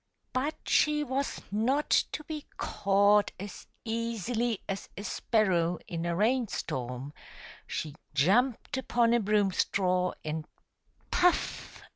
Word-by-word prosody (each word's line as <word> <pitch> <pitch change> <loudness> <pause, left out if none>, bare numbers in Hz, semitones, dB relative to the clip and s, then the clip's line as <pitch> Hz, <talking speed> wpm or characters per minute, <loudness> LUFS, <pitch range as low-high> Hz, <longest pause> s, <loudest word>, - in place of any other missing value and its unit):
But 280 +5 0
she 300 0 +3
was 270 0 -2
not 255 +8 +1
to 305 - +2
be 305 -1 -6
caught 200 +1 +3
as 200 0 -8 0.2
easily 230 0 -1
as 195 0 -4
a 200 - -5
sparrow 180 -7 +1
in 170 0 -3
a 170 - 0
rain 235 +5 +2
storm; 125 -2 -4 0.5
she 150 - -4 0.2
jumped 235 - +2
upon 235 -2 +2
a 240 - +4
broom 205 -2 +2
straw, 180 -1 +1
and 155 0 -3 0.3
— - - -38
puff! 360 -1 +1
210 Hz, 125 wpm, -30 LUFS, 180-245 Hz, 0.5 s, a